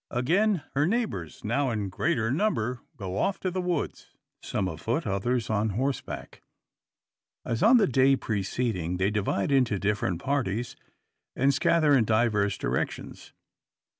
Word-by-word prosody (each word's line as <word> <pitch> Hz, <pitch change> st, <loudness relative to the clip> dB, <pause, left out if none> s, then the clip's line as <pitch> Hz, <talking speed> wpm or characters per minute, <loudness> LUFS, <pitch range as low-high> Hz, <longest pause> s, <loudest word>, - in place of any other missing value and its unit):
Again 175 Hz, -, +1 dB
her 145 Hz, +3 st, +2 dB
neighbours, 185 Hz, -, -2 dB
now 130 Hz, +5 st, 0 dB
in 105 Hz, -4 st, -2 dB
greater 115 Hz, -, 0 dB
number, 125 Hz, -, 0 dB, 0.2 s
go 95 Hz, -3 st, -5 dB
off 195 Hz, -, 0 dB
to 185 Hz, -, -1 dB
the 185 Hz, +1 st, -2 dB
woods, 180 Hz, -4 st, -3 dB, 0.3 s
some 95 Hz, -, -2 dB
afoot, 110 Hz, -, -2 dB
others 115 Hz, +4 st, -1 dB
on 110 Hz, 0 st, 0 dB
horseback. 135 Hz, +1 st, -3 dB, 1.0 s
As 115 Hz, 0 st, -2 dB
on 240 Hz, +4 st, +7 dB
the 215 Hz, -, +4 dB
day 135 Hz, +1 st, +4 dB
preceding, 100 Hz, -5 st, -2 dB
they 95 Hz, +3 st, +1 dB
divide 105 Hz, +2 st, -1 dB
into 125 Hz, -6 st, +3 dB
different 100 Hz, -3 st, -1 dB
parties, 120 Hz, -3 st, -2 dB, 0.6 s
and 135 Hz, +2 st, +3 dB
scatter 155 Hz, 0 st, +3 dB
in 120 Hz, -4 st, +3 dB
diverse 105 Hz, -2 st, +1 dB
directions. -, -, -4 dB
120 Hz, 135 wpm, -27 LUFS, 100-145 Hz, 1.0 s, on